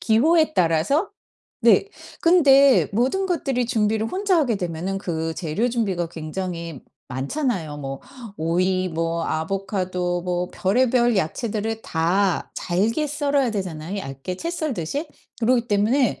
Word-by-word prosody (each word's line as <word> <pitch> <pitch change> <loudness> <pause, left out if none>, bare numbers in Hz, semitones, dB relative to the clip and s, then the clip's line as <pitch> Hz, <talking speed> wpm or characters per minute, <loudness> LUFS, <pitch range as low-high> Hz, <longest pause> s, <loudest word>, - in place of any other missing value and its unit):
기호에 310 +8 +3
따라서? 175 - +2 0.5
네. 400 - +5 0.3
근데 280 -6 +6
모든 265 - +1
것들이 270 -8 0
준비를 220 -2 +1
혼자 385 -1 +1
하게 255 -8 +2
되면은 180 +1 -3
그 165 -3 -3
재료 180 +10 -1
준비가 190 -8 -1
굉장히 165 -1 -5 0.3
많잖아요. 155 - -2
뭐 135 -1 -6 0.4
오이 185 +3 +1
뭐 165 0 -2
아보카도 180 +1 -2
뭐 180 0 -2
별의별 240 +3 +2
야채들을 220 +5 -2
다 175 +3 0
잘게 220 - 0
썰어야 285 -3 +1
되잖아요 185 -3 -4
얇게 135 +2 -6
채 335 - -3
썰듯이. 295 - -3 0.3
그렇기 235 0 +2
때문에 220 +5 +2
200 Hz, 280 characters per minute, -23 LUFS, 170-255 Hz, 0.5 s, 근데